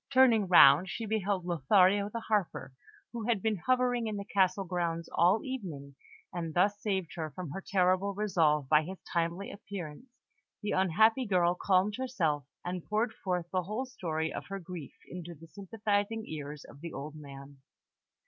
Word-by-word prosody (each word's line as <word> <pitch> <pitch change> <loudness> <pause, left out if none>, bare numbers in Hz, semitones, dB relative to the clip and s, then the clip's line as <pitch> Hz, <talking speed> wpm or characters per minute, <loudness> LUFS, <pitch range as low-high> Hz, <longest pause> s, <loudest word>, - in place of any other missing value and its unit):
Turning 240 -6 +5
round, 175 0 +7
she 225 - -4
beheld 200 -4 -1
Lothario 185 +5 +3
the 230 +2 -5
Harper, 205 -11 -1 0.4
who 230 -2 -4
had 235 -4 +2
been 215 +1 0
hovering 250 +2 +1
in 215 -1 -3
the 200 - -5
castle 195 -1 +2
grounds 170 -2 -2
all 180 +6 +3
evening; 170 - -6 0.4
and 165 -3 -4
thus 200 +3 +2
saved 190 -5 -1
from 160 0 -5
her 195 - -5
terrible 185 +1 +2
resolve 160 -9 +2
by 150 +2 +5
his 185 +5 -7 0.2
timely 170 +3 -1
appearance, 200 - -8 0.5
the 205 - -1
unhappy 220 +7 +3
girl 175 -3 +3
calmed 190 +3 +1
herself, 170 - -1 0.2
and 180 -1 -3
poured 220 +2 0
forth 180 -5 -2
the 185 - +1
whole 215 +8 -3
story 160 -10 -3
of - - -6
her 195 - -4
grief 175 -5 -8
into 175 -1 -8
the 160 +2 -14
sympathising 205 +5 -2
ears 150 -1 -7
of 140 - -15
the 170 0 -6
old 150 +1 -6
man. 140 -1 -11
185 Hz, 165 wpm, -31 LUFS, 165-210 Hz, 0.5 s, round